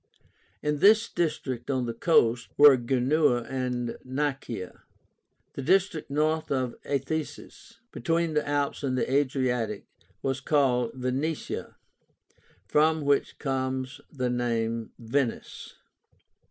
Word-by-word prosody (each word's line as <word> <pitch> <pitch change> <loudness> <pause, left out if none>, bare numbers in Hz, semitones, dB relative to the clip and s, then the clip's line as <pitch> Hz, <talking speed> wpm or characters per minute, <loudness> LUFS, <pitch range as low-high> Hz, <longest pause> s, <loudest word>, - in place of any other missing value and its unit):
In 150 -1 0
this 215 +4 +6
district 145 -8 -2
on 130 -3 0
the 115 - -3
coast 120 -3 +2
were 145 -2 +9
Genua 125 +1 +2
and 125 -2 -3
Nicaea. 130 -7 -4 0.7
The - - -5
district 180 +1 +1
north 155 +2 0
of 130 -3 0
the 145 - -2
Athesis, 160 - -5
between 165 -1 0
the 150 -1 0
Alps 145 -1 -1
and 130 -3 -1
the - - 0
Adriatic, 125 -6 0 0.4
was 135 -1 -1
called 125 -5 +2
VENETIA, 130 +5 -3 0.9
from 155 +6 +3
which 140 0 +1
comes 130 -2 -3
the 130 -4 -2
name 115 -2 -1
Venice. 120 +2 -3
135 Hz, 115 wpm, -27 LUFS, 125-150 Hz, 0.9 s, were